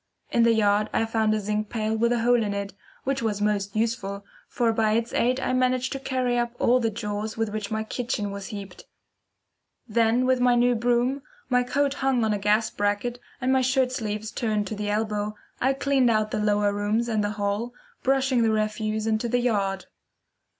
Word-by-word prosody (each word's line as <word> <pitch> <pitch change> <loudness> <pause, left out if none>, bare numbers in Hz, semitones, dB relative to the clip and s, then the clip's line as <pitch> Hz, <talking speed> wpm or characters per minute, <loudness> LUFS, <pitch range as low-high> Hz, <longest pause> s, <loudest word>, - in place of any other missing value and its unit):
In 235 - +3
the 230 0 +5
yard 210 0 +2
I 225 - +2
found 220 -1 +1
a - - 0
zinc 210 +1 -2
pail 220 -1 -1
with 235 +2 +2
a 240 -1 +1
hole 240 0 +4
in 205 -2 -1
it, 200 0 -4 0.3
which 270 -1 -1
was 215 -3 -1
most 205 -1 -1
useful, 205 -3 -2 0.2
for 235 -2 +1
by 220 -1 +2
its 230 +1 -1
aid 250 +2 +2
I 255 - -1
managed 255 0 +1
to 270 - -3
carry 255 -2 0
up 240 0 -2
all 250 +1 +3
the 230 -2 +1
jaws 210 0 -4
with 225 -1 0
which 210 -1 -4
my 220 0 -2
kitchen 220 -3 -3
was 200 -1 -6
heaped. 200 -3 -8 1.0
Then 230 +2 +2
with 255 0 +2
my 245 0 +4
new 245 +1 +4
broom, 245 +3 +1 0.3
my 250 -1 +3
coat 275 +3 0
hung 270 -4 +1
on 215 - +1
a 205 - -1
gas 210 +2 +2
bracket 205 +4 -1 0.2
and 255 +1 +1
my 265 - +3
shirt 255 0 +2
sleeves 215 -2 -3
turned 215 -3 -1
to 215 - -4
the 205 0 -3
elbow, 210 0 -1 0.2
I 265 +2 +2
cleaned 270 -2 +2
out 215 -1 +1
the - - -1
lower 205 -1 +2
rooms 210 +3 0
and 220 -3 0
the 205 0 -1
hall, 205 +4 -1 0.3
brushing 265 -2 +2
the 225 - +3
refuse 215 0 -1
into 220 +1 0
the 245 - +2
yard. 200 -5 0
225 Hz, 205 wpm, -25 LUFS, 210-245 Hz, 1.0 s, the